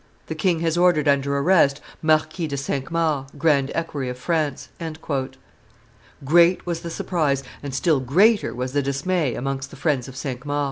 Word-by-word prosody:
The - - -4
king 175 -5 0
has 165 0 +1
ordered 175 -4 +3
under 140 0 +2
arrest 140 -2 +3 0.2
Marquis 155 +1 +1
de 140 -2 -4
Cinq 135 0 -3
Mars, 155 -5 0
grand 140 -3 +2
equerry 150 -6 -3
of 125 - -5
France." 150 0 -2 1.6
Great 170 +5 +4
was 170 -2 -2
the 170 - -6
surprise, 150 -5 -1 0.2
and 140 - -5
still 150 +2 +2
greater 195 - +3
was 125 +1 -4
the 145 - +2
dismay, 140 +1 -1
amongst 135 +1 -3
the - - -12
friends 140 -4 0
of 130 - -10
Cinq 130 -1 -5
Mars. 145 0 -2
145 Hz, 170 wpm, -23 LUFS, 135-165 Hz, 1.6 s, Great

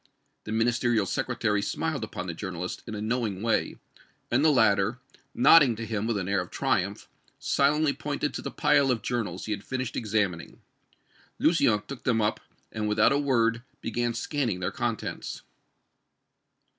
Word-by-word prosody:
The 110 - -5
Ministerial 115 -1 +2
Secretary 105 +2 -1
smiled - - -2
upon 90 - -5
the 85 - -4
journalist 90 0 -5
in 110 - -5
a 105 - -5
knowing 110 -4 -2
way, 115 -1 +1 0.6
and 130 +4 +3
the 160 - +6
latter, 110 -3 +3 0.4
nodding 135 -1 +6
to 115 +1 -5
him 110 -1 -2
with 115 -3 0
an 95 -2 -3
air 100 -1 +1
of 90 - -8
triumph, 105 -6 -1 0.3
silently 145 +1 +2
pointed 145 +1 -3
to - - -4
the - - -4
pile 145 -2 +3
of 115 -5 0
journals 115 -8 -3
he 110 - -4
had 100 -1 -3
finished 130 -2 -4
examining. 105 -6 -1 0.8
Lucien 120 -11 +3
took 135 -2 -8
them 115 -2 +2
up, 105 0 0 0.3
and 105 -1 -2
without 105 - +4
a 140 - +2
word 115 -5 +2 0.2
began 120 +1 -2
scanning 120 - -1
their 90 +2 -2
contents. 115 +1 -4
115 Hz, 160 wpm, -27 LUFS, 105-130 Hz, 0.8 s, the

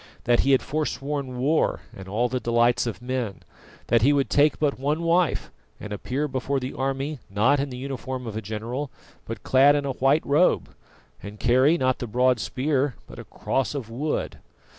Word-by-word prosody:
That 120 0 +3
he 140 - +3
had 130 - +3
forsworn 140 -3 -3
war 145 +6 +1
and 95 -1 -10
all 110 +6 0
the 130 +1 -2
delights 120 +1 +2
of 115 +1 -5
men; 125 -7 -3 0.4
that 115 -1 +3
he 140 +5 +5
would 140 -1 0
take 145 0 +4
but 145 -3 0
one 150 +5 -1
wife 170 0 +1 0.3
and 105 - -6
appear 135 +8 -2
before 135 0 -1
the 130 0 -5
army, 135 +2 -2
not 115 +9 +3
in 140 +1 -1
the 125 - -7
uniform 130 -1 -5
of 110 -2 -6
a 110 - -3
general, 115 +7 -4 0.4
but - - -7
clad 140 +2 +5
in 145 -1 -1
a 140 - -1
white 135 +4 +2
robe, 150 +6 +3 0.5
and 105 +1 -9
carry, 130 +7 +4
not 130 -3 +1
the 120 - -4
broad 125 +2 +2
spear, 135 +2 -1
but - - -12
a - - -7
cross 135 +2 -2
of 120 -5 -5
wood. 145 +6 -3
130 Hz, 190 wpm, -25 LUFS, 120-145 Hz, 0.5 s, he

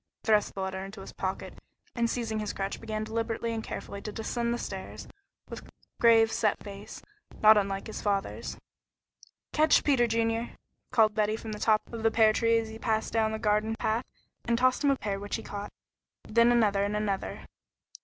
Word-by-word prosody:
He - - -20
thrust 210 -1 +3
the 195 - -3
letter 190 0 -3
into 195 +1 -9
his - - -10
pocket, 190 0 -4 0.3
and 235 -1 0
seizing 225 -3 -2
his 210 -1 -3
crutch 195 0 -4
began 215 -1 -3
deliberately 230 +1 -2
and 225 -1 -3
carefully 200 - -6
to 210 - -5
descend 235 +2 -2
the 240 - 0
stairs, - - -7 0.4
with - - -7 0.4
grave, 225 -2 +6
set 215 -2 +1
face, 200 0 -9 0.4
not 215 +1 +9
unlike 195 -1 0
his 220 - -6
father's. 200 -2 -2 1.0
"Catch, 310 0 +4
Peter 260 -5 +3
Junior," 230 +1 -1 0.3
called 220 -4 +4
Betty 215 0 +1
from 220 0 -7
the 210 - -5
top 215 -1 +3
of 230 - -4
the 225 - +4
pear 220 -1 +4
tree 230 +1 +3
as 225 -1 -2
he 220 0 -9
passed 220 -1 -1
down 220 -1 +2
the 220 - -2
garden 215 +1 +1
path, 225 +2 -1 0.4
and 235 -1 +1
tossed 255 +3 +2
him 285 - +4
a 275 - +4
pear 200 -6 -3
which 205 +1 -4
he - - -5
caught, 205 0 -6 0.6
then 235 +2 +4
another 210 -4 +3
and 205 +1 -1
another. 200 -2 -3
220 Hz, 195 wpm, -29 LUFS, 210-230 Hz, 1.0 s, not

